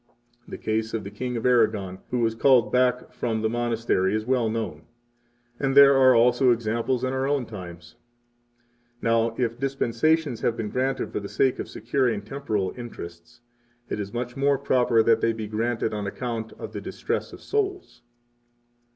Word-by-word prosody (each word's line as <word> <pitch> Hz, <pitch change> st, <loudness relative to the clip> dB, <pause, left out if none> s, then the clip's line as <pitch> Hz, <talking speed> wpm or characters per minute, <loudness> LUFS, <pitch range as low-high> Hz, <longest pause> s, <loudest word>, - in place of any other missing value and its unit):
The -, -, -7 dB
case 110 Hz, +1 st, -2 dB
of 110 Hz, -, -3 dB
the 100 Hz, -, -7 dB
King 125 Hz, +3 st, -4 dB
of 115 Hz, -, -4 dB
Aragon 110 Hz, -6 st, +2 dB
who 125 Hz, -1 st, -1 dB
was 115 Hz, -1 st, +1 dB
called 115 Hz, -2 st, +4 dB
back 125 Hz, 0 st, +1 dB
from 110 Hz, -2 st, -2 dB
the 110 Hz, -, +2 dB
monastery 115 Hz, -5 st, 0 dB
is 110 Hz, 0 st, -2 dB
well 125 Hz, -3 st, +1 dB
known, 110 Hz, -9 st, -4 dB, 0.7 s
and 135 Hz, 0 st, 0 dB
there 140 Hz, -1 st, +9 dB
are 130 Hz, -1 st, +6 dB
also 125 Hz, +2 st, +4 dB
examples 120 Hz, +2 st, 0 dB
in 130 Hz, 0 st, -1 dB
our 130 Hz, 0 st, 0 dB
own 140 Hz, -3 st, 0 dB
times. 85 Hz, -5 st, -10 dB, 1.0 s
[Now, 115 Hz, -1 st, +1 dB
if 120 Hz, -1 st, -1 dB
dispensations 135 Hz, +1 st, 0 dB
have 115 Hz, -, 0 dB
been 110 Hz, -2 st, -3 dB
granted 130 Hz, +1 st, -1 dB
for -, -, -2 dB
the 100 Hz, -1 st, -7 dB
sake 130 Hz, -2 st, +1 dB
of -, -, -5 dB
securing 120 Hz, -7 st, -1 dB
temporal 105 Hz, -6 st, -2 dB
interests, 120 Hz, -2 st, -10 dB, 0.5 s
it -, -, -2 dB
is 100 Hz, -1 st, -4 dB
much 120 Hz, +1 st, -4 dB
more 140 Hz, 0 st, +2 dB
proper 125 Hz, -4 st, +2 dB
that 115 Hz, 0 st, +3 dB
they 115 Hz, -, +2 dB
be 110 Hz, -1 st, -5 dB
granted 110 Hz, +1 st, -1 dB
on 105 Hz, -1 st, -3 dB
account 115 Hz, 0 st, -4 dB
of -, -, -9 dB
the -, -, -5 dB
distress -, -, -3 dB
of -, -, -11 dB
souls. 390 Hz, -3 st, -3 dB
115 Hz, 175 wpm, -25 LUFS, 110-130 Hz, 1.0 s, there